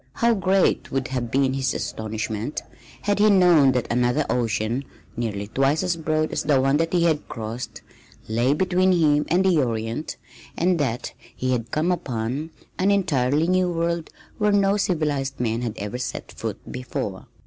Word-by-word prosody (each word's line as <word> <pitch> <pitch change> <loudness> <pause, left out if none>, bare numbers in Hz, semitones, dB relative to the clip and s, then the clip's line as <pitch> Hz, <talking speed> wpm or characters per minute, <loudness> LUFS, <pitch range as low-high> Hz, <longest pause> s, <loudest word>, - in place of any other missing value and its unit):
How 235 0 +3
great 190 -1 +1
would 135 -1 -1
have 125 -3 -2
been 135 +1 +2
his 135 -1 -1
astonishment 110 +3 -3 0.4
had 205 0 +1
he 215 +1 +6
known 175 -8 +6
that 125 -2 0
another 125 +5 +2
ocean 115 +1 0 0.3
nearly 105 -4 -3
twice 135 - +1
as 180 -2 0
broad 155 -1 -1
as - - -1
the 145 -3 +3
one 135 +2 +3
that 165 +1 0
he 175 -2 +2
had 160 -3 +1
crossed, 115 +2 -6 0.4
lay 120 +5 +2
between 185 +2 +2
him 150 -4 +3
and 180 +3 +2
the 175 -5 +4
Orient, 115 +3 -3 0.4
and 175 0 +2
that 125 -5 -2 0.2
he 130 0 -1
had 120 -2 -1
come 155 +7 +1
upon 135 -2 -2 0.3
an 190 +2 +3
entirely 155 -6 +2
New 185 0 +2
World 170 -1 -1 0.3
where 210 -1 +3
no 200 0 +3
civilized 150 -8 -1
men 115 -1 0
had 120 -3 -2
ever 105 +4 -4
set 125 - -5
foot - - -5
before! 115 -6 -5
145 Hz, 170 wpm, -23 LUFS, 120-175 Hz, 0.4 s, he